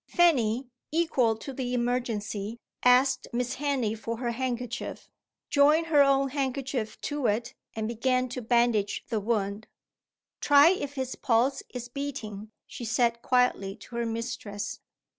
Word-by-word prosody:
Fanny, 260 -8 +3 0.2
equal 285 -8 +2
to 270 +4 -7
the 250 -1 -2
emergency, 230 -3 -2 0.2
asked 255 +1 +4
Miss 245 +1 -1
Henley 270 -6 0
for 225 +1 -5
her 240 0 -2
handkerchief, 250 0 -4 0.4
joined 300 +3 +5
her 305 -3 +5
own 275 -1 +4
handkerchief 265 -4 -2
to 290 -4 -1
it, 220 +3 -1 0.2
and 220 -1 -2
began 255 +2 +1
to 250 +1 -5
bandage 235 -3 +1
the 225 -3 0
wound. 205 -1 -2 0.7
"Try 290 +2 +7
if 285 -6 -1
his 260 -1 -3
pulse 250 +3 +1
is 245 -1 -6
beating," 240 -6 -6 0.2
she - - -9
said 235 0 +1
quietly 250 -7 +1
to 235 +2 -10
her 235 -1 0
mistress. 225 -3 -4
245 Hz, 140 wpm, -28 LUFS, 225-270 Hz, 0.7 s, Try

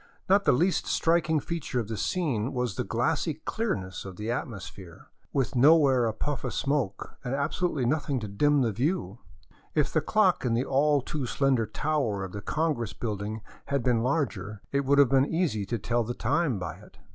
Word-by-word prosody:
Not 200 +1 +4
the - - +6
least 175 +9 +1
striking 165 -1 +2
feature 160 -5 -3
of 115 - -3
the 110 - -4
scene 130 - -1
was 125 -4 -1
the - - -2
glassy 140 - 0
clearness 125 - -3
of 95 -2 -8
the 105 +4 -3
atmosphere, 100 -7 -7 0.2
with 130 -5 -1
nowhere 135 -2 +5
a - - +1
puff 140 +4 -3
of - - -3
smoke, 140 -9 -2
and 130 0 -2
abso 145 +6 0
lutely 135 -7 -2
nothing 145 0 0
to 105 - -4
dim 145 +8 +2
the 115 - +1
view; 120 - -1 0.6
if 150 - +1
the 155 - +3
clock 190 +3 +2
in 120 -3 +1
the 125 +3 0
all 145 +1 +3
too 140 -3 -3
slender 130 -4 +1
tower 120 -5 -1
of 95 - -6
the 100 - -6
congress 150 -5 -1
building 105 -1 -4 0.2
had 140 -3 -1
been 120 -2 +2
larger, 110 - -2
it 140 0 0
would 140 +1 +3
have 140 -3 +6
been 135 +1 +3
easy 150 - 0
to 120 - -1
tell 120 +1 0
the 120 +2 -4
time 155 -10 +1
by 85 -4 -5
it. - - -17
130 Hz, 195 wpm, -28 LUFS, 110-150 Hz, 0.6 s, the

